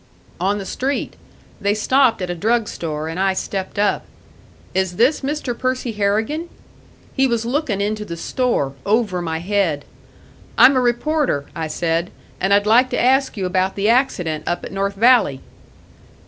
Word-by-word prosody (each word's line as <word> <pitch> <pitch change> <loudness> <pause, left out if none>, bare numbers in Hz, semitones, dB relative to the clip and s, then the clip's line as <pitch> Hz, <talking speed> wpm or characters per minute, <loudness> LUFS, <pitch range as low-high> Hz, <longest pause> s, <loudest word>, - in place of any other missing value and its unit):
"On 195 +3 +1
the 195 - -5
street. 270 +7 -2 0.5
They 200 +1 +1
stopped 240 -1 +2
at 180 - -3
a - - -1
drug 220 +5 +1
store, 155 -2 -4
and 165 +3 -5
I 190 0 +2
stepped 190 0 -4
up. 205 0 +1 0.7
'Is 190 -1 0
this 250 - +3
Mr. 280 -3 -3
Percy 255 0 -2
Harrigan?' 220 +11 -1 0.6
He 270 -1 +3
was 235 -2 -1
looking 245 -5 -1
into 210 +1 -1
the 170 -5 -7
store, 235 - -1
over 205 -4 +1
my 160 -2 -2
head. 170 -5 0 0.7
'I'm 270 - +7
a 255 - +3
reporter,' 245 - 0
I 160 -1 -3
said, 165 +2 -1 0.3
'and 190 - 0
I'd 205 +1 +4
like 240 +4 +4
to 245 - -1
ask 265 0 +2
you 190 - -2
about 185 +1 0
the 205 +2 +1
accident 185 - +1
up 175 - -2
at - - -8
North 195 +1 -2
Valley.' 225 - +4
205 Hz, 165 wpm, -20 LUFS, 180-250 Hz, 0.7 s, I'm